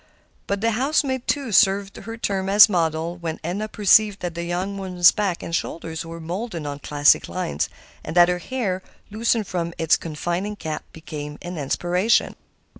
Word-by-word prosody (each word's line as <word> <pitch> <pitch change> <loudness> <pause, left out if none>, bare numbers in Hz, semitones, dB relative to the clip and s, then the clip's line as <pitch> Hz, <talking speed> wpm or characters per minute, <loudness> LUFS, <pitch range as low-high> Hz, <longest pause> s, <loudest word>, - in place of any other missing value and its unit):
But 200 0 -1
the 230 +1 +2
house 270 +8 +1
maid, 260 -2 -3
too, 275 -5 -1
served 195 0 +3
her 225 0 -8
term 195 -3 -2
as 205 +2 +9
model 165 -2 -1
when 165 -2 -5
Edna 190 +6 -3
perceived 210 -1 +3
that 175 -1 -3
the 170 +1 -4
young 185 +3 -3
woman's 180 -2 +5
back 195 -5 -2
and 170 - -6
shoulders 160 -1 -4
were 165 0 -8
molded 170 0 -5
on 145 0 -5
classic 145 0 +3
lines, 80 - -2 0.3
and 155 - -6
that 175 -1 +7
her 180 0 0
hair, 200 -4 -3 0.3
loosened 225 0 +1
from 170 -2 -3
its 160 -1 +3
confining 175 +6 -3
cap, 160 -6 -5
became 150 -2 -7
an 175 -1 -5
inspiration. 175 +9 +1
180 Hz, 175 wpm, -23 LUFS, 165-210 Hz, 0.3 s, as